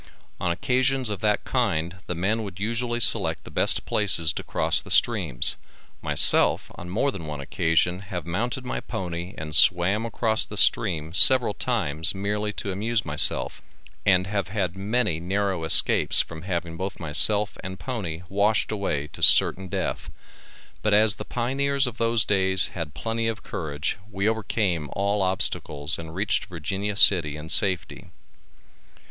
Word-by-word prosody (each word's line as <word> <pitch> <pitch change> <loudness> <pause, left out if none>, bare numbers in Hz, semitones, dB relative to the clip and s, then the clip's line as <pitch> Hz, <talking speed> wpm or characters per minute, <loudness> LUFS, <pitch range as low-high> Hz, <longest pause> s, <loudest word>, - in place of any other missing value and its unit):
On 90 - -2
occasions 130 +4 0
of 100 - -4
that 105 0 0
kind 90 -9 -2
the 90 - -4
men 100 +7 -1
would 100 -4 -9
usually 120 +3 -2
select - - +1
the - - -13
best - - 0
places 90 -6 +1
to - - -5
cross - - -1
the - - -14
streams, - - +2 0.4
myself - - +4
on 85 - -10
more 120 +10 0
than 85 -10 -9
one 75 -2 -6
occasion 80 +5 -1
have 95 -3 -7
mounted 120 +9 -4
my - - -4
pony 85 0 -7
and 75 -1 -6
swam 95 +7 +4
across 110 -1 -1
the - - -9
stream 80 0 +1
several 120 +3 +8
times 90 - 0
merely 105 +2 -3
to 100 - -5
amuse 110 +3 -2
myself - - +1 0.4
and 90 -2 +2
have 100 -1 -3
had 95 -3 -3
many 105 -3 -1
narow 95 0 -2
escapes 80 - +4
from 80 -1 -2
having 85 -2 -5
both 95 +3 -6
myself 100 +6 +3
and 95 0 -7
pony 90 -10 -6
washed 100 +3 0
away 95 -9 -3
to - - -12
certain 95 0 +4
death, - - -4 0.7
but 105 -1 +2
as 105 0 +3
the - - -6
pioneers 135 +3 -1
of 120 -2 -6
those 115 -1 +2
days 95 -1 +2
had 80 -4 -7
plenty 115 +7 -3
of 115 0 -5
courage 75 -1 -4
we 100 +1 -2
overcame 100 -8 -2
all 100 +1 -1
obstacles 90 -5 0
and 80 0 -9
reached 100 +1 0
Virginia 95 +4 -5
City 85 -7 +4
in 75 +1 -10
safety. 95 +1 +1
95 Hz, 155 wpm, -24 LUFS, 85-110 Hz, 0.7 s, several